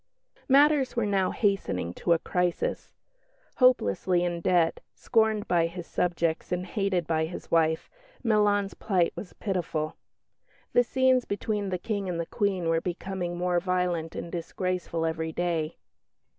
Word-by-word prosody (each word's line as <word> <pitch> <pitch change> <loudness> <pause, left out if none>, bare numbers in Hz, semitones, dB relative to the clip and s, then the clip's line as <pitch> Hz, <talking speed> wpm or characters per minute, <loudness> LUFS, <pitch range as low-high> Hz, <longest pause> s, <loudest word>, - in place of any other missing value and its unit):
Matters 280 -1 +5
were 235 -2 +1
now 195 -2 +1
hastening 195 - 0
to 170 - +1
a - - +3
crisis. 180 +1 -2 0.6
Hopelessly 185 - +3
in 175 -1 -2
debt, 170 -2 +2 0.2
scorned 220 -3 +1
by 170 -2 +3
his 170 0 -7
subjects, 170 -2 -1
and 180 0 -1
hated 195 -3 -1
by 160 0 +1
his 175 - -9
wife, 160 -1 +2 0.4
Milan's 205 -3 +2
plight 185 -5 +1
was 195 - -8
pitiful. 170 -6 -2 0.8
The 245 - +5
scenes 260 0 +2
between 205 0 -2
the 185 - -1
King 200 0 -3
and 170 -2 -2
the 170 - -1
Queen 190 -2 -1
were 165 0 +2
becoming 180 0 -4
more 175 0 +1
violent 180 -3 -1
and 170 - -5
disgraceful 175 -1 -2
every 160 0 -2
day. 165 -2 -2
180 Hz, 145 wpm, -27 LUFS, 170-205 Hz, 0.8 s, Matters